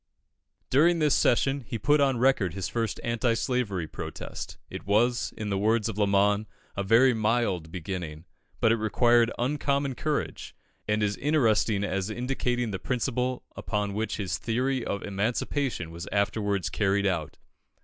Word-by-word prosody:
During 165 Hz, +6 st, +5 dB
this 150 Hz, -3 st, +3 dB
session, 135 Hz, +2 st, +2 dB
he 115 Hz, -, -3 dB
put 145 Hz, +7 st, +3 dB
on 135 Hz, -3 st, +3 dB
record 115 Hz, -8 st, +2 dB
his 95 Hz, -3 st, -2 dB
first 115 Hz, -3 st, -2 dB
anti 115 Hz, 0 st, +1 dB
slavery 115 Hz, -9 st, -1 dB
protest. -, -, -7 dB
It -, -, -8 dB
was, 120 Hz, +4 st, +2 dB
in 105 Hz, -2 st, -3 dB
the 100 Hz, -, 0 dB
words 110 Hz, +1 st, +2 dB
of 110 Hz, -, -4 dB
Lamon, 100 Hz, +1 st, +3 dB, 0.3 s
"a 100 Hz, -, -1 dB
very 115 Hz, +6 st, +5 dB
mild 110 Hz, -7 st, 0 dB
beginning," 85 Hz, -3 st, -5 dB, 0.3 s
but 115 Hz, -, +4 dB
it 115 Hz, -, +3 dB
required 120 Hz, +2 st, +3 dB
uncommon 140 Hz, +1 st, 0 dB
courage, 150 Hz, +3 st, -3 dB, 0.3 s
and 105 Hz, 0 st, +1 dB
is 100 Hz, -1 st, 0 dB
interesting 115 Hz, -8 st, +2 dB
as 95 Hz, 0 st, -1 dB
indicating 120 Hz, 0 st, -1 dB
the 95 Hz, -, -3 dB
principle 125 Hz, +2 st, -1 dB
upon 105 Hz, -2 st, -2 dB
which 110 Hz, +2 st, -2 dB
his 100 Hz, -3 st, -2 dB
theory 125 Hz, +2 st, 0 dB
of 100 Hz, -3 st, -3 dB
Emancipation 105 Hz, -, -2 dB
was 85 Hz, +2 st, -7 dB
afterwards 100 Hz, -1 st, 0 dB
carried 100 Hz, -1 st, +1 dB
out. 85 Hz, -5 st, -1 dB
110 Hz, 150 wpm, -27 LUFS, 100-125 Hz, 0.3 s, During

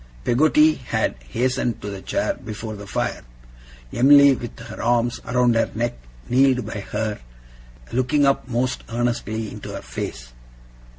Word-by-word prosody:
Peggotty 150 Hz, +4 st, +4 dB
had 125 Hz, -, -1 dB, 0.2 s
hastened 125 Hz, -, 0 dB
to 105 Hz, -, -6 dB
the 95 Hz, -1 st, -7 dB
chair -, -, -1 dB
before 110 Hz, 0 st, -7 dB
the 100 Hz, 0 st, -9 dB
fire. -, -, -2 dB, 0.7 s
Em'ly, 140 Hz, +2 st, +7 dB
with 120 Hz, -2 st, -7 dB
her -, -, -8 dB
arms 120 Hz, 0 st, +1 dB
around 125 Hz, 0 st, +3 dB
her 115 Hz, -, +2 dB
neck, 120 Hz, +2 st, -1 dB, 0.3 s
kneeled 130 Hz, -1 st, +3 dB
by 105 Hz, -1 st, -5 dB
her, 110 Hz, -1 st, -2 dB, 0.7 s
looking 140 Hz, +4 st, +2 dB
up 140 Hz, -1 st, +1 dB
most 125 Hz, +1 st, -1 dB
earnestly 115 Hz, -2 st, -2 dB
into -, -, -8 dB
her -, -, -6 dB
face. -, -, -6 dB
120 Hz, 140 wpm, -22 LUFS, 110-130 Hz, 0.7 s, Em'ly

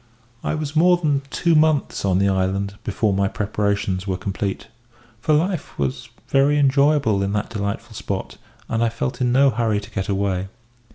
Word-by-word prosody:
"I -, -, -1 dB
was 155 Hz, -1 st, -4 dB
more 175 Hz, +3 st, +5 dB
than 145 Hz, -5 st, +1 dB
two 170 Hz, +3 st, +1 dB
months 155 Hz, -2 st, +2 dB
on 95 Hz, -2 st, +2 dB
the 100 Hz, +1 st, +3 dB
island 95 Hz, +1 st, 0 dB
before 105 Hz, 0 st, 0 dB
my 100 Hz, 0 st, +1 dB
preparations 100 Hz, -2 st, -1 dB
were 95 Hz, -1 st, -1 dB
complete, 100 Hz, +1 st, -3 dB, 0.5 s
for 135 Hz, -, -1 dB
life 175 Hz, +2 st, -1 dB
was 130 Hz, -2 st, -3 dB, 0.2 s
very 140 Hz, +2 st, +3 dB
enjoyable 140 Hz, -6 st, +3 dB
in 100 Hz, +1 st, -1 dB
that 105 Hz, 0 st, -2 dB
delightful 100 Hz, -2 st, -4 dB
spot, -, -, -5 dB, 0.3 s
and 115 Hz, 0 st, 0 dB
I 115 Hz, -, +2 dB
felt 115 Hz, +3 st, -4 dB
in 125 Hz, -1 st, +2 dB
no 135 Hz, +2 st, +5 dB
hurry 110 Hz, -4 st, 0 dB
to 100 Hz, -, -11 dB
get 95 Hz, +2 st, -3 dB
away. 95 Hz, -1 st, 0 dB
110 Hz, 175 wpm, -22 LUFS, 100-140 Hz, 0.5 s, more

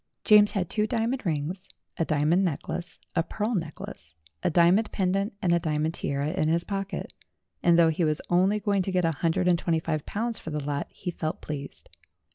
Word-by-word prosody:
James 210 Hz, -1 st, +6 dB
had 185 Hz, -4 st, 0 dB
two 215 Hz, +3 st, 0 dB
dia 225 Hz, -2 st, 0 dB
mond 250 Hz, -4 st, -2 dB
rings, 170 Hz, +5 st, -3 dB, 0.3 s
a -, -, +1 dB
diamond 155 Hz, +5 st, +2 dB
necklace, 175 Hz, +1 st, -3 dB, 0.2 s
a 165 Hz, -, +4 dB
pearl 210 Hz, +7 st, -2 dB
necklace, 155 Hz, -, -6 dB, 0.3 s
a -, -, +1 dB
diamond 175 Hz, +6 st, +4 dB
pendant, 195 Hz, +2 st, 0 dB
and 175 Hz, -2 st, +3 dB
a 170 Hz, -, +4 dB
diamond 155 Hz, -1 st, -1 dB
tiara 140 Hz, 0 st, -1 dB
in 170 Hz, -3 st, 0 dB
his 165 Hz, +2 st, +2 dB
pocket, 195 Hz, -1 st, -4 dB, 0.5 s
and 170 Hz, -1 st, +5 dB
though 165 Hz, -1 st, +6 dB
he 160 Hz, +2 st, 0 dB
was 155 Hz, -1 st, +1 dB
only 190 Hz, +4 st, +3 dB
going 200 Hz, -2 st, +1 dB
to 190 Hz, -, -2 dB
get 180 Hz, -2 st, +2 dB
a 165 Hz, -, +2 dB
hundred 170 Hz, +2 st, +1 dB
and 175 Hz, -2 st, +4 dB
twenty 165 Hz, -2 st, +1 dB
five 155 Hz, -2 st, -2 dB
pounds 230 Hz, +1 st, -2 dB
for -, -, -7 dB
the 150 Hz, -2 st, -3 dB
lot 145 Hz, 0 st, -2 dB
he 180 Hz, -, -5 dB
felt 155 Hz, -2 st, -3 dB
pleased. 140 Hz, -2 st, -7 dB
175 Hz, 205 wpm, -27 LUFS, 155-195 Hz, 0.5 s, James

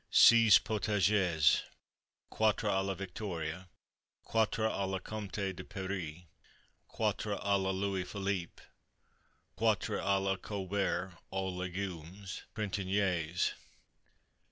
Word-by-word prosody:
Seize 115 Hz, -3 st, +8 dB
Potages. 100 Hz, -6 st, +2 dB, 0.7 s
Quatre 110 Hz, 0 st, +2 dB
à 95 Hz, -2 st, +2 dB
la 95 Hz, 0 st, -2 dB
Victoria. 90 Hz, -2 st, -5 dB, 0.5 s
Quatre 110 Hz, -1 st, +1 dB
à 100 Hz, -3 st, 0 dB
la 95 Hz, -, -1 dB
Comte 105 Hz, 0 st, -6 dB, 0.2 s
de -, -, -8 dB
Paris. 90 Hz, -4 st, -5 dB, 0.6 s
Quatre -, -, -1 dB
à 100 Hz, 0 st, +1 dB
la 95 Hz, -, 0 dB
Louis 95 Hz, -1 st, -1 dB
Philippe. 95 Hz, -2 st, -3 dB, 0.9 s
Quatre -, -, +1 dB
à 100 Hz, 0 st, +2 dB
la 95 Hz, 0 st, 0 dB
Colbert, 95 Hz, -2 st, -2 dB
aux 95 Hz, 0 st, -1 dB
Légumes 90 Hz, 0 st, -5 dB, 0.3 s
Printaniers. 95 Hz, -5 st, 0 dB
95 Hz, 100 wpm, -33 LUFS, 90-100 Hz, 0.9 s, Seize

